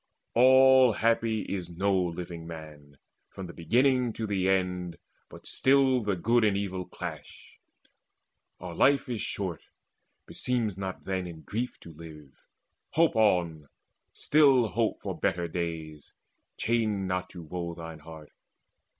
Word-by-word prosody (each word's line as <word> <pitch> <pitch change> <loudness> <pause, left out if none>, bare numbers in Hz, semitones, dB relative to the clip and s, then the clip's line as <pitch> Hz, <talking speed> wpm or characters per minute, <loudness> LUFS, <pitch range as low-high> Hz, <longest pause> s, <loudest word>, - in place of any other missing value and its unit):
All 130 0 +6
happy 115 -1 +1
is 90 -3 -5
no 95 +3 0
living 85 -2 -3
man 75 -3 -11 0.3
From 95 - -8
the 85 - -9
beginning 125 - +2
to 110 - -4
the 95 -3 0
end, 90 -2 -1 0.3
but - - -13
still 135 -1 +3
The 105 -3 -1
good 115 +6 +2
and 105 -2 +2
evil 95 -2 -3
clash. - - -9 1.0
Our 90 -1 -7
life 140 +10 +3
is 120 -4 -3
short; 95 -5 -4 0.6
Beseems 120 -6 -2
not 95 -1 -6
then 95 -2 -2
in 80 -2 -10
grief 120 +8 -4
to 85 - -12
live. 75 -3 -12 0.6
Hope 165 -4 +3
on, 85 -9 +1 0.4
Still 135 -6 +4
hope 115 0 -1
for - - -5
better 85 0 -1
days: 80 -3 -5 0.4
chain 110 -4 0
not 90 0 -2
to 90 -2 -10
woe 85 +1 -5
Thine 80 -1 -9
heart. 80 -1 -12
95 Hz, 135 wpm, -28 LUFS, 85-115 Hz, 1.0 s, All